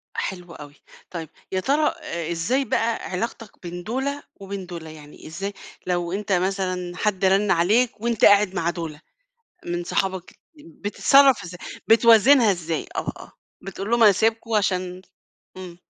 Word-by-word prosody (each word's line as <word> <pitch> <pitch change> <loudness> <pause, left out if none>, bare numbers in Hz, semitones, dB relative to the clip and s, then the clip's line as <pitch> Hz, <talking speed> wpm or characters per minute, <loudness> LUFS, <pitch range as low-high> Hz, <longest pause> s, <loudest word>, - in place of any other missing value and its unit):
حلو 180 -2 -5
أوي. 145 -1 -11 0.4
طيب، 165 -3 -6 0.2
يا 190 - 0
ترى 295 +8 +2
أ 170 0 -4
إزاي 245 +12 0
بقى 230 +1 0 0.2
علاقتك 225 +2 -5
بين 175 0 -7
دُولا 270 +6 -3 0.2
وبين 195 -1 -6
دُولا؟ 165 -3 -8
يعني 150 -1 -13
إزاي 195 +5 -5 0.3
لو 175 -1 -1
أنت 200 +1 -4
مثلًا 185 -1 -1
حد 195 -3 0
رن 195 +1 +3
عليك 210 +6 +2
وأنت 235 -2 +2
قاعد 205 -2 +5
مع 170 0 0
دُولا 165 -3 -6 0.7
من 175 0 -3
صحابك 190 0 -3 0.3
بتتصرف 225 - +3
إزاي؟ 175 +1 -9 0.3
بتوازنها 230 +1 +6
إزاي؟ 165 -3 -3
آه، - - -3
آه، - - -12 0.3
بتقول 195 +2 -6
لهم 235 -1 +4
أنا 210 - +8
سايبكم 225 +2 0
عشان 185 -3 0 0.6
إمم. 180 -2 -9
190 Hz, 145 wpm, -23 LUFS, 175-225 Hz, 0.7 s, أنا